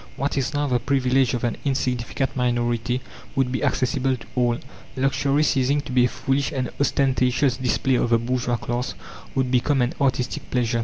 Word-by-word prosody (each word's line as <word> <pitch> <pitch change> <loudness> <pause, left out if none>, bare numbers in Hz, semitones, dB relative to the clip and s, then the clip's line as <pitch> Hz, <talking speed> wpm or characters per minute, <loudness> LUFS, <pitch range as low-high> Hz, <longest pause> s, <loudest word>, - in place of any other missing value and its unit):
What 140 +2 -1
is 135 -1 0
now 145 0 +1
the 125 -3 +1
privilege 130 0 +2
of 120 - -4
an 120 -2 -1
insignificant 130 0 -1
minority 120 0 0 0.3
would 135 -2 +1
be 130 - -2
accessible 130 0 +1
to - - -13
all. 120 -2 +2 0.4
Luxury, 140 +2 +1
ceasing 140 0 +2
to 130 - -8
be 125 -1 +4
a - - +1
foolish 135 +3 -1
and 130 -2 -2
ostentatious 130 -2 +2
display 130 +1 +1
of 120 - +1
the 115 - +5
bourgeois 120 0 -1
class, 120 +2 -3 0.4
would 130 -2 +1
become 135 +2 +2
an 125 0 +1
artistic 130 -2 0
pleasure. 120 -2 0
130 Hz, 175 wpm, -23 LUFS, 120-135 Hz, 0.4 s, the